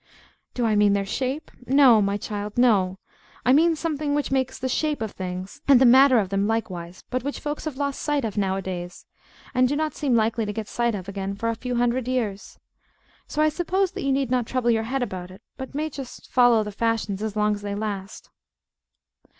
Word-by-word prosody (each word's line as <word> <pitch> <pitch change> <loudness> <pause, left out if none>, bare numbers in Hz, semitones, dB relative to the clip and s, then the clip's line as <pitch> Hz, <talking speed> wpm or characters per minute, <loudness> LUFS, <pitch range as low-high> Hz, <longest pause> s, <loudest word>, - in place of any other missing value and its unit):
Do 245 - 0
I 220 -2 +2
mean 205 -1 +4
their 200 -1 0
shape? 265 +8 -3 0.2
No, 260 -5 +6
my 200 0 0
child; 205 +1 -5
no. 200 -7 +3 0.5
I 255 - +5
mean 325 +3 +4
something 300 -2 -2
which 295 -2 -1
makes 260 -2 0
the 260 - -3
shape 300 +3 0
of 220 -2 -3
things, 185 0 -6
and 275 -3 +7
the 260 - +5
matter 260 +1 +7
of 200 -4 +1
them 195 +1 0
likewise, 185 -6 -3
but 255 0 0
which 285 +1 -4
folks 295 +1 -4
have 300 -4 -4
lost 280 -1 -2
sight 290 -4 0
of 215 - -4
nowadays, 190 -3 -3 0.5
and 255 -1 +4
do 285 - -1
not 310 +1 -1
seem 275 -5 0
likely 225 0 +1
to 210 -1 -3
get 215 0 -5
sight 235 -1 0
of 190 -2 -7
again 195 0 -4
for 230 +3 -2
a 230 - -1
few 250 +2 -4
hundred 245 +1 +1
years. 225 -6 -3 0.7
So 305 - 0
I 310 - +4
suppose 365 +4 0
that 390 0 -6
you 275 - 0
need 270 -2 0
not 250 -3 +1
trouble 250 -2 +1
your 225 -1 +2
head 270 -1 0
about 185 -6 -5
it, 190 +4 -14
but 265 +1 -8
may 305 +2 -1
just 275 -4 -9
follow 245 -3 +5
the 210 - -6
fashions 220 -2 -1
as 220 -1 -3
long 210 0 +2
as 205 - -5
they 205 0 -4
last. 205 -2 -5
235 Hz, 215 wpm, -24 LUFS, 205-270 Hz, 0.7 s, and